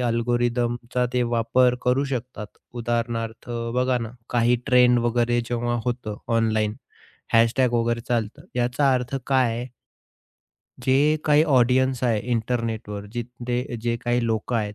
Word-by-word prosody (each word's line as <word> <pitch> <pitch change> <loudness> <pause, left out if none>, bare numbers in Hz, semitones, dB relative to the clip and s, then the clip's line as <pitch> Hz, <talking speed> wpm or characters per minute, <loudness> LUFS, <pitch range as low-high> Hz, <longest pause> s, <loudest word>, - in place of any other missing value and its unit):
अल्गोरिदमचा 120 +1 0
ते 125 - +2
वापर 120 +1 +2
करू 125 +3 +2
शकतात 125 -5 -5 0.3
उदाहरणार्थ 115 0 -3 0.3
बघा 125 0 +2
ना 115 -1 -5 0.2
काही 120 0 +3
ट्रेंड 125 -2 +5
वगैरे 120 0 +1
जेव्हा 120 0 -1
होतं 120 -4 -3 0.2
ऑनलाईन 110 -2 +1 0.6
हॅशटॅग 115 +2 +3
वगैरे 115 0 +1
चालतं 115 -3 -1
याचा 125 +3 +2
अर्थ 125 +1 -2
काय 130 -4 +3
आहे? 125 +1 -5 1.2
जे 145 +4 +3
काही 150 0 +5
ऑडियन्स 130 -2 +2
आहे 115 -3 +2
इंटरनेटवर 110 -3 -2
जिथे 120 +1 -4
जे 120 0 0
काही 120 0 +1
लोक 110 +2 -2
आहेत 105 -2 -1
120 Hz, 125 wpm, -24 LUFS, 115-125 Hz, 1.2 s, ट्रेंड